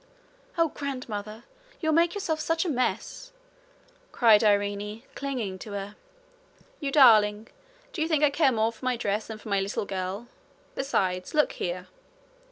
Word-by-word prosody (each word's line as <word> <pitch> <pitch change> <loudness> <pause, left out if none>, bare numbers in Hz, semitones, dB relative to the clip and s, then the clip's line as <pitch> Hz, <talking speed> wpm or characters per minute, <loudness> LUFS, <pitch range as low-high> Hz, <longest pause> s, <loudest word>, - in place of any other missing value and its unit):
'Oh, 330 -1 +3
grandmother! 235 -7 -6 0.4
You'll 315 -2 +1
make 335 +3 +3
yourself 330 -6 -2
such 330 +2 0
a - - -1
mess!' 305 - -2 0.8
cried 225 -3 +5
Irene, 205 +1 0
clinging 240 -9 -4
to 210 - -8
her. 200 +1 -5 0.8
'You 280 -3 -2
darling! 220 -6 +5 0.4
do 330 - -4
you 315 - +1
think 310 -2 +1
I 295 - +5
care 285 -2 +3
more 225 -1 +1
for 230 - -19
my 255 -1 0
dress 210 -1 -2
than 220 - -6
for 215 - -11
my 200 -1 +2
little 200 +1 -2
girl? 195 +4 -4 0.5
Besides 185 -7 -1
look 300 - +3
here.' 180 +1 -4
225 Hz, 155 wpm, -27 LUFS, 205-285 Hz, 0.8 s, cried